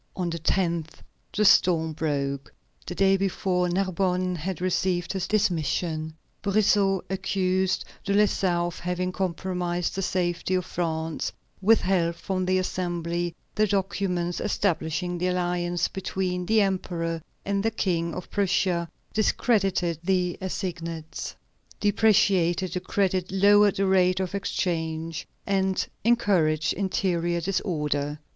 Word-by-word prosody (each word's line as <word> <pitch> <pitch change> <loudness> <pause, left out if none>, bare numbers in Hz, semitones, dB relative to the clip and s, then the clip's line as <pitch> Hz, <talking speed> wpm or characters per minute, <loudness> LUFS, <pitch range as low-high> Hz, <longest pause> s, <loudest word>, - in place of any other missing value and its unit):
On 180 -2 -2
the 170 - -3
10th 170 -2 0 0.4
the 210 - +1
storm 165 -5 +4
broke. 140 -3 -2 0.4
The - - -4
day 195 0 +4
before, 185 -2 0
Narbonne 185 0 0
had 180 +2 -4
received 180 0 0
his 190 -1 -2
dismission. 160 -5 0 0.3
Brissot 200 -2 +2
accused 190 0 0 0.2
De 200 - -2
Lessart 195 -4 +2
of 175 - -5
having 180 +1 -2
compromised 180 -1 -2
the 195 - -2
safety 180 0 0
of 185 -1 0
France, 160 -3 -2 0.3
withheld 185 -5 +3
from 185 0 -2
the 185 0 +3
Assembly 175 -2 -2 0.2
the 215 0 +2
documents 185 -3 -1
establishing 175 -3 -1
the 180 - 0
alliance 175 -1 0
between 180 -1 -3
the 220 0 +4
Emperor 170 -4 -1 0.2
and 200 0 0
the 225 - +2
King 170 -6 -1
of 180 - -7
Prussia, 185 -3 +1 0.2
discredited 195 - +1
the 180 -1 +1
assignats, 170 -4 -4 0.4
depreciated 195 -4 +3
the 180 - -1
credit, 185 -1 0
lowered 205 +1 +5
the 195 - +1
rate 185 -1 +3
of 190 -1 -2
exchange, 165 -4 -2 0.2
and 190 -1 +1 0.2
encouraged 180 -9 +2
interior 175 -3 0
disorder. 150 -5 -1
180 Hz, 120 wpm, -26 LUFS, 170-195 Hz, 0.4 s, lowered